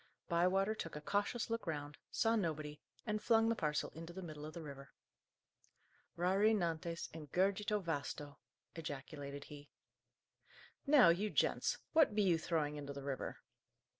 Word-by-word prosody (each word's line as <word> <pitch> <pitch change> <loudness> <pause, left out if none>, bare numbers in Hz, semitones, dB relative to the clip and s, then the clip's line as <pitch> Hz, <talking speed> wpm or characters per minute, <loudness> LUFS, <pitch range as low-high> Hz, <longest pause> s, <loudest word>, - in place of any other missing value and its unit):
Bywater 185 +4 +3
took 165 -8 -6
a - - -3
cautious 205 +7 0
look 230 -4 -2
round, 145 -2 -3
saw 225 0 +2
nobody, 155 -7 -2 0.2
and 215 -1 -1
flung 225 -1 +4
the 230 - +2
parcel 150 -6 -1
into 165 +1 -8
the 190 +1 -6
middle 155 -3 -7
of 155 - -9
the 170 - -6
river. 140 -2 -9 1.3
"Rari 195 +5 +4
nantes 170 -2 -2
in 155 -2 -8
gurgite 200 +5 +1
vasto!" 145 -3 -3 0.3
ejaculated 145 -2 -6
he. 145 0 -11 1.2
"Now, 275 - +8
you 195 +6 +2
gents, - - +2 0.2
what 315 -10 +5
be 210 - +4
you 175 -4 +4
throwing 150 -3 0
into 140 -1 -5
the 140 0 -7
river?" 135 -1 -4
165 Hz, 150 wpm, -37 LUFS, 150-205 Hz, 1.3 s, Now